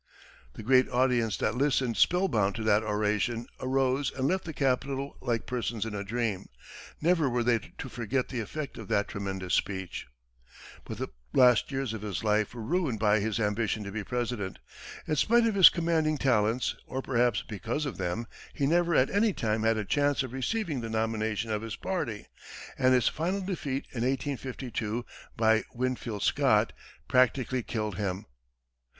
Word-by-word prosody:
The -, -, -9 dB
great 130 Hz, +3 st, +4 dB
audience 120 Hz, -4 st, +2 dB
that -, -, 0 dB
listened 130 Hz, -2 st, +1 dB
spellbound 140 Hz, -, +2 dB
to 115 Hz, -, -4 dB
that 110 Hz, -1 st, +4 dB
oration, 105 Hz, +2 st, 0 dB
arose 130 Hz, +1 st, +1 dB
and 135 Hz, 0 st, -1 dB
left 185 Hz, +3 st, 0 dB
the 165 Hz, -, -4 dB
Capitol 135 Hz, 0 st, -1 dB
like 120 Hz, -3 st, -1 dB
persons 115 Hz, -3 st, -2 dB
in 110 Hz, -, -5 dB
a 100 Hz, -1 st, -3 dB
dream. 105 Hz, -2 st, -2 dB, 0.5 s
Never 165 Hz, -3 st, +2 dB
were 120 Hz, -1 st, 0 dB
they 120 Hz, -1 st, +3 dB, 0.2 s
to -, -, -5 dB
forget 120 Hz, +2 st, -2 dB
the 130 Hz, -, -3 dB
effect 140 Hz, +6 st, -5 dB
of -, -, -8 dB
that 105 Hz, -3 st, +1 dB
tremendous 95 Hz, -2 st, -4 dB
speech. 95 Hz, -2 st, -2 dB, 0.8 s
But -, -, -6 dB
the -, -, -4 dB, 0.2 s
last 125 Hz, -1 st, +5 dB
years 135 Hz, -4 st, -2 dB
of 110 Hz, -, -5 dB
his 105 Hz, 0 st, -4 dB
life 105 Hz, +1 st, +1 dB
were 115 Hz, -, -6 dB
ruined 155 Hz, -3 st, 0 dB
by 105 Hz, 0 st, +3 dB
his 110 Hz, +2 st, -1 dB
ambition 105 Hz, 0 st, 0 dB
to 100 Hz, -, -6 dB
be 105 Hz, +1 st, -4 dB
President. 120 Hz, -5 st, -3 dB, 0.5 s
In 155 Hz, -, +1 dB
spite 235 Hz, +9 st, +4 dB
of 225 Hz, -, +2 dB
his 195 Hz, -3 st, +9 dB
commanding 160 Hz, -2 st, +1 dB
talents, 120 Hz, -2 st, +2 dB
or, 130 Hz, 0 st, -4 dB
perhaps, 120 Hz, -4 st, +1 dB
because 105 Hz, -, -3 dB
of 135 Hz, -, -4 dB
them, 95 Hz, +5 st, -2 dB, 0.3 s
he 140 Hz, -, 0 dB
never 170 Hz, +3 st, +2 dB
at 130 Hz, -, +3 dB
any 205 Hz, +1 st, +3 dB
time 110 Hz, -5 st, -1 dB
had 110 Hz, 0 st, +2 dB
a 105 Hz, -, -2 dB
chance 145 Hz, +3 st, +1 dB
of 130 Hz, -2 st, -7 dB
receiving 150 Hz, -, -2 dB
the 115 Hz, -, -5 dB
nomination 110 Hz, 0 st, -1 dB
of 105 Hz, -1 st, -1 dB
his 115 Hz, -1 st, -5 dB
party, 120 Hz, -, -3 dB, 0.5 s
and 130 Hz, 0 st, +4 dB
his 125 Hz, -3 st, +3 dB
final 180 Hz, +5 st, -1 dB
defeat 150 Hz, -8 st, -3 dB
in 120 Hz, -, -4 dB
1852, 125 Hz, -3 st, -2 dB, 0.3 s
by 110 Hz, -1 st, +4 dB
Winfield 120 Hz, -4 st, -2 dB
Scott, -, -, +3 dB, 0.3 s
practically 130 Hz, 0 st, +2 dB
killed 105 Hz, -4 st, -3 dB
him. 100 Hz, 0 st, -2 dB
120 Hz, 170 wpm, -29 LUFS, 110-135 Hz, 0.8 s, his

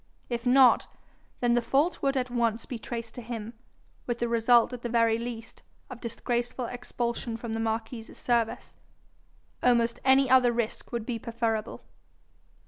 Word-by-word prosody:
If 240 Hz, 0 st, -3 dB
not, 255 Hz, 0 st, +6 dB, 0.5 s
then 240 Hz, -1 st, +3 dB
the 240 Hz, -, +3 dB
fault 275 Hz, +9 st, +1 dB
would 275 Hz, 0 st, +1 dB
at 250 Hz, -1 st, -1 dB
once 235 Hz, -2 st, 0 dB
be 245 Hz, -, -6 dB
traced 230 Hz, 0 st, -6 dB
to 245 Hz, -, -7 dB
him, 230 Hz, -1 st, -6 dB, 0.5 s
with 240 Hz, -1 st, -1 dB
the 235 Hz, -, -1 dB
result 235 Hz, +1 st, +4 dB
at 245 Hz, -, -6 dB
the 240 Hz, -, -3 dB
very 230 Hz, -1 st, +3 dB
least, 230 Hz, -1 st, -7 dB, 0.3 s
of 245 Hz, -, -9 dB
disgraceful 240 Hz, +2 st, -2 dB
expulsion 235 Hz, -1 st, -4 dB
from 230 Hz, -1 st, -5 dB
the 225 Hz, -, -2 dB
marquis's 225 Hz, +1 st, -3 dB
service. 235 Hz, -2 st, -1 dB, 0.9 s
Almost 235 Hz, -1 st, +2 dB
any 265 Hz, 0 st, +5 dB
other 255 Hz, -1 st, +5 dB
risk 235 Hz, -2 st, -3 dB
would 235 Hz, -3 st, -3 dB
be 235 Hz, -2 st, -3 dB
preferable. 230 Hz, -2 st, -2 dB
235 Hz, 155 wpm, -28 LUFS, 230-245 Hz, 0.9 s, not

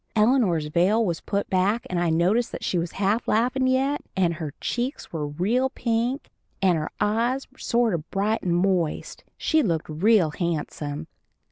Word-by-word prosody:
Eleanor's 215 Hz, -, +3 dB
veil 185 Hz, +9 st, +2 dB
was 170 Hz, -4 st, -2 dB
put 200 Hz, 0 st, -2 dB
back, 195 Hz, +5 st, +1 dB
and 180 Hz, -, -1 dB
I 175 Hz, -1 st, +1 dB
noticed 180 Hz, +9 st, +2 dB
that -, -, -6 dB
she 180 Hz, -, 0 dB
was 170 Hz, 0 st, -3 dB
half 205 Hz, +4 st, 0 dB
laughin' 255 Hz, +4 st, +2 dB
yet, 270 Hz, +3 st, +1 dB
and 175 Hz, -3 st, +2 dB
her 155 Hz, -4 st, -6 dB
cheeks 245 Hz, -, -3 dB
were 150 Hz, -3 st, -2 dB
real 210 Hz, -, 0 dB
pink, 240 Hz, +1 st, -2 dB, 0.3 s
and 185 Hz, -3 st, +3 dB
her 155 Hz, -1 st, -2 dB
eyes 230 Hz, +6 st, +1 dB
sort 235 Hz, -4 st, +1 dB
of 160 Hz, -2 st, -4 dB
bright 210 Hz, +3 st, 0 dB
and 175 Hz, -2 st, 0 dB
moist 180 Hz, -3 st, 0 dB
she 315 Hz, -1 st, +2 dB
looked 165 Hz, -, -1 dB
real 175 Hz, +1 st, +3 dB
handsome. 155 Hz, -2 st, -3 dB
195 Hz, 165 wpm, -25 LUFS, 170-235 Hz, 0.3 s, Eleanor's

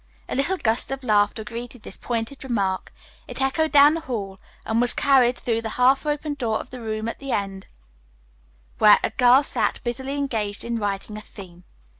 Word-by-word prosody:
A -, -, -5 dB
little 310 Hz, +8 st, 0 dB
gust 230 Hz, -6 st, -1 dB
of 270 Hz, 0 st, -5 dB
laughter 210 Hz, -1 st, +1 dB
greeted 235 Hz, +1 st, -8 dB
this -, -, -8 dB
pointed 235 Hz, +3 st, -4 dB
remark. 200 Hz, -7 st, -2 dB, 0.4 s
It -, -, -8 dB
echoed 290 Hz, +4 st, 0 dB
down 290 Hz, +1 st, +7 dB
the 330 Hz, -, -2 dB
hall, 200 Hz, -8 st, -5 dB, 0.3 s
and 225 Hz, +1 st, +1 dB
was 245 Hz, -, +5 dB
carried 260 Hz, -4 st, +3 dB
through 230 Hz, -2 st, -1 dB
the 225 Hz, -, -4 dB
half 265 Hz, +3 st, +3 dB
opened 295 Hz, -1 st, -2 dB
door 225 Hz, -4 st, -1 dB
of -, -, -10 dB
the 255 Hz, -1 st, -8 dB
room 220 Hz, 0 st, -4 dB
at 230 Hz, -, -5 dB
the 275 Hz, -1 st, -6 dB
end, 195 Hz, -2 st, -3 dB, 1.1 s
where 210 Hz, -1 st, +7 dB
a -, -, 0 dB
girl 255 Hz, +2 st, +5 dB
sat -, -, 0 dB
busily 265 Hz, +3 st, -3 dB
engaged 225 Hz, -8 st, -2 dB
in 235 Hz, -1 st, -3 dB
writing 205 Hz, +1 st, -4 dB
a -, -, -7 dB
theme. 180 Hz, -5 st, -13 dB
240 Hz, 190 wpm, -23 LUFS, 215-270 Hz, 1.1 s, down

